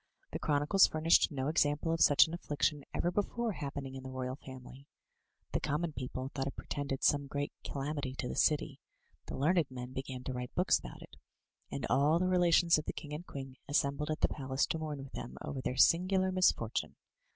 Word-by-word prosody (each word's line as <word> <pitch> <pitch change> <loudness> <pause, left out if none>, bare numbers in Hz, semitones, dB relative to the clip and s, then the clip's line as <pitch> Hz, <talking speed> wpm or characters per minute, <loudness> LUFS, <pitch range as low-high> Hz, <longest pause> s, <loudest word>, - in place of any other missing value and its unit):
The - - -4
chronicles 150 +6 +4
furnished 160 +2 +3
no 135 -2 -2
example 150 0 +1
of 165 - -1
such 145 - +7
an 160 - -7
affliction 145 -3 -1
ever 175 - 0
before 220 +4 -1
happening 140 -5 -5
in 135 - -7
the 130 - -8
royal 130 0 -4
family. 130 0 -12 0.6
The - - 0
common 155 +2 -1
people 130 0 -4
thought 135 -1 -2
it 140 - -5
portended 140 -2 -4
some 145 -1 +3
great 145 +1 -3
calamity 140 -1 -3
to 125 - -3
the - - -4
city, 150 -2 +1 0.5
the - - -5
learned 160 +2 +2
men 125 0 -7
began 130 -1 -5
to 130 - -4
write 125 -1 -6
books - - +3
about - - -10
it; - - -15 0.5
and 135 - -3
all 145 +5 +3
the 185 - +1
relations 175 -2 +4
of 155 - -7
the - - -3
king 150 -1 -8
and 160 +4 -6
queen 135 -1 -8
assembled 145 +1 0
at 155 - -2
the - - +5
palace 130 -1 -1
to 160 - -2
mourn 150 -3 -4
with 135 - -11
them - - -7
over 135 - -4
their 130 - -3
singular 185 +2 +4
misfortime. 180 -11 +1
145 Hz, 200 wpm, -33 LUFS, 130-160 Hz, 0.6 s, such